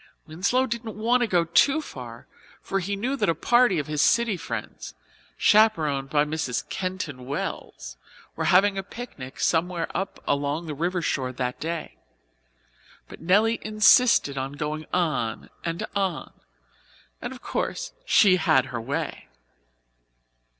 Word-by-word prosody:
Winslow 195 +11 +1
didn't 230 -3 -5
want 240 +3 +2
to 240 - +2
go 175 -4 +2
too 275 - +4
far, 120 - -9 0.3
for 195 - -2
he 200 +2 -2
knew 245 +7 -2
that 270 - 0
a 165 - +2
party 240 -6 +3
of 150 - -1
his 150 -1 -1
city 235 +1 +3
friends, 110 - -6 0.4
chaperoned 155 - +3
by 150 0 +2
Mrs. 150 -5 -3
Keyton 185 -9 -4
Wells, - - -5 0.4
were - - -2
having 195 +2 +4
a - - -1
picnic 190 - -9
somewhere 170 0 0
up 195 - -3
along 145 +3 -1
the 155 - -5
river 175 +4 -2
shore 130 -4 -1
that 125 0 -3
day. 165 0 -5 1.1
But - - -12
Nelly 210 +7 +3
insisted 215 - +4
on 135 +1 -4
going 150 +1 -4
on 155 -11 -1
and 170 +5 -3
on, 190 -5 -2 0.9
and - - -5
of - - -11
course - - -3
she 190 -3 +5
had 155 -8 +3
her 120 - -3
way. 145 +7 -4
170 Hz, 145 wpm, -25 LUFS, 145-205 Hz, 1.1 s, she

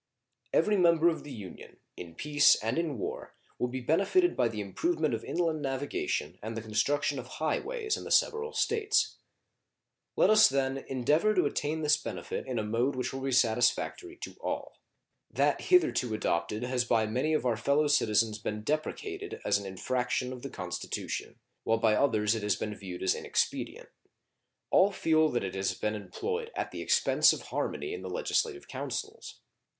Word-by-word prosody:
Every 210 -1 +3
member 170 -2 +5
of 165 - -3
the 145 - -9
Union, 105 -7 -10 0.2
in 85 -2 -9
peace 145 - +5
and 115 +8 -1
in 160 -6 -2
war, - - -5 0.2
will 125 - +1
be 130 +1 -5
benefited 200 - +2
by 125 - +2
the 110 -2 -5
improvement 150 - -1
of 110 - -3
inland 165 -3 -1
navigation 135 - -2
and 110 +1 -5
the - - -3
construction 130 +6 0
of 125 - -8
high 155 -1 0
ways 445 -1 -2
in - - -8
the - - -7
several 460 -1 +2
States. 440 0 +1 1.0
Let - - +4
us, 215 0 +7
then, 135 0 0
endeavor 150 - +2
to 180 - +3
attain 155 +2 -1
this 145 -1 +4
benefit - - -5
in 130 -2 -3
a 110 - 0
mode 120 +6 0
which 125 0 -3
will 135 - -5
be 135 0 -2
satisfactory 120 - +1
to - - -7
all. - - -4 0.5
That - - +1
hitherto 125 - +3
adopted 85 +2 -1
has 125 0 0
by 115 -2 +2
many 130 +9 0
of 150 - -1
our 120 -2 +2
fellow 140 +7 +2
citizens 110 -6 +2
been 105 0 -4
deprecated 395 - -3
as - - +3
an 100 - -7
infraction 125 +5 -2
of 125 - -9
the - - -6
Constitution, - - -5 0.3
while 115 - +2
by 110 -1 +3
others 105 -3 +2
it 115 - -3
has 105 -1 +1
been 105 - -4
viewed 95 -4 -7
as 95 - +3
inexpedient. - - -2 0.8
All 195 +2 +5
feel 160 -4 +3
that 120 -5 -1
it 95 - -4
has 95 0 -1
been 105 - -2
employed 450 - -4
at - - -3
the - - -6
expense 470 0 +4
of - - -6
harmony 395 - -3
in 435 - -6
the - - -6
legislative 455 -5 -1
councils. 430 +2 -5
135 Hz, 180 wpm, -30 LUFS, 110-185 Hz, 1.0 s, us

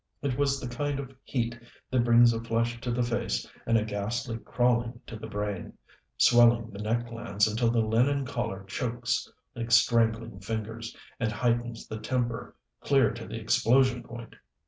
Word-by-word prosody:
It 135 -3 0
was 140 0 +1
the 130 - -5
kind 140 +3 -2
of 135 -1 -7
heat 120 -2 -2 0.4
that 125 -2 +3
brings 120 0 +6
a 115 - -3
flush 115 0 -1
to 125 - -4
the 120 +1 +1
face 115 - -1 0.2
and 115 0 +4
a 105 - +1
ghastly 115 +3 -3
crawling 120 0 0
to 115 - -8
the 110 +1 -7
brain, 105 -3 -4 0.4
swelling 120 -1 +5
the 100 - -9
neck 115 +3 0
glands 115 -3 0
until 115 +2 +1
the 115 0 +2
linen 130 +6 +2
collar 110 -6 -3
chokes 120 +4 -2 0.2
like 115 0 -4
strangling 115 -2 +3
fingers, 110 +3 -5 0.2
and 115 -3 0
heightens 120 +1 -1
the 110 - -5
temper 120 -1 -2 0.2
clear 135 -6 +3
to - - -8
the - - -5
explosion 125 +1 +3
point. 115 -1 -10
115 Hz, 170 wpm, -28 LUFS, 115-120 Hz, 0.4 s, brings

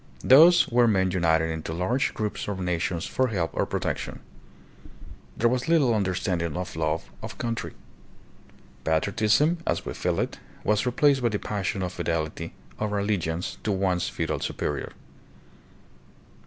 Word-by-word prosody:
Thus 165 +7 +7
were 120 0 +4
men 95 -4 +2
united 80 -2 +2
into 80 0 -4
large 105 +11 0
groups 105 -1 -3
or 100 - -2
nations 90 -2 -2
for 130 - +1
help 90 -8 -1
or - - 0
protection. - - -3 1.2
There 120 - +3
was 125 +1 0
little 155 -8 +4
under 95 -4 0
standing 85 -4 -1
of 90 -1 -5
love 80 0 -2
of - - -7
country. 115 -1 -3 1.1
Patriotism, 110 - +2
as - - 0
we - - -4
feel - - -1
it, - - -2 0.2
was 105 +4 +1
replaced 135 +2 +3
by 120 - +2
the 105 - -1
passion 100 -2 -2
of 90 0 -3
fidelity 85 -3 -3 0.2
or 105 -1 -1
allegiance 90 -5 -2
to 110 - 0
one's 95 -2 0
feudal - - -2
superior. - - -3
100 Hz, 145 wpm, -26 LUFS, 85-120 Hz, 1.2 s, Thus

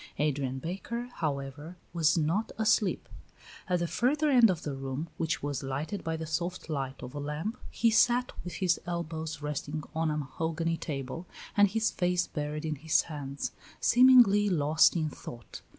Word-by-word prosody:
Adrian 140 -3 0
Baker, 200 - -4
however, 145 +2 -4 0.2
was 165 -1 +3
not 170 +8 0
asleep. 215 -3 +2 0.6
At 180 - +3
the 170 0 -1
further 290 - +1
end 240 -4 +7
of 175 -3 -1
the 145 - -3
room, 135 +4 -4
which 160 -3 -1
was 145 -2 -2
lighted 140 +9 -4
by 160 0 -2
the 160 - -5
soft 170 +2 -3
light 135 -2 -3
of 125 - -7
a 145 - -4
lamp, 150 - -4
he 230 -1 +2
sat 245 +2 +4
with 180 - -6
his 180 -2 +1
elbows 160 -3 -4
resting 150 +1 -3
on 160 0 0
a 150 - -1
mahogany 160 +4 -2
table 145 +3 -5 0.3
and 205 -1 +6
his 220 +3 0
face 180 0 +1
buried 150 +1 -4
in 155 -1 -2
his 160 +2 +2
hands, 140 -3 -5 0.3
seemingly 240 -5 +6
lost 155 -2 +4
in 160 -2 +1
thought. 120 -6 -9
160 Hz, 165 wpm, -30 LUFS, 145-185 Hz, 0.6 s, end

